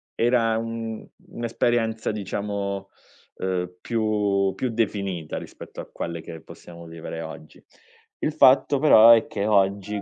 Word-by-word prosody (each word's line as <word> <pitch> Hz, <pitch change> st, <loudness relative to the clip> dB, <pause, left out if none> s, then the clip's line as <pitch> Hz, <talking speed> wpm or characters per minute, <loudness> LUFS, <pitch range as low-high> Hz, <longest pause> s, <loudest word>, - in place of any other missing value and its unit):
era 115 Hz, -1 st, +2 dB
un 115 Hz, -1 st, -5 dB, 0.2 s
un'esperienza 115 Hz, -1 st, -1 dB
diciamo, 100 Hz, -1 st, -4 dB, 0.5 s
ehm, 90 Hz, -1 st, -3 dB
più 105 Hz, -4 st, 0 dB
più 130 Hz, -, -2 dB
definita 100 Hz, -7 st, -2 dB
rispetto -, -, -9 dB
a -, -, -9 dB
quelle 85 Hz, -1 st, -5 dB
che 80 Hz, -1 st, -10 dB
possiamo 85 Hz, +2 st, -13 dB
vivere 80 Hz, 0 st, -7 dB
oggi. 80 Hz, -1 st, -10 dB, 0.6 s
Il 150 Hz, -, 0 dB
fatto 140 Hz, -1 st, +5 dB
però 115 Hz, -6 st, +8 dB
è 115 Hz, -1 st, +6 dB
che 100 Hz, 0 st, -3 dB
oggi 100 Hz, 0 st, +1 dB
105 Hz, 125 wpm, -24 LUFS, 95-115 Hz, 0.6 s, però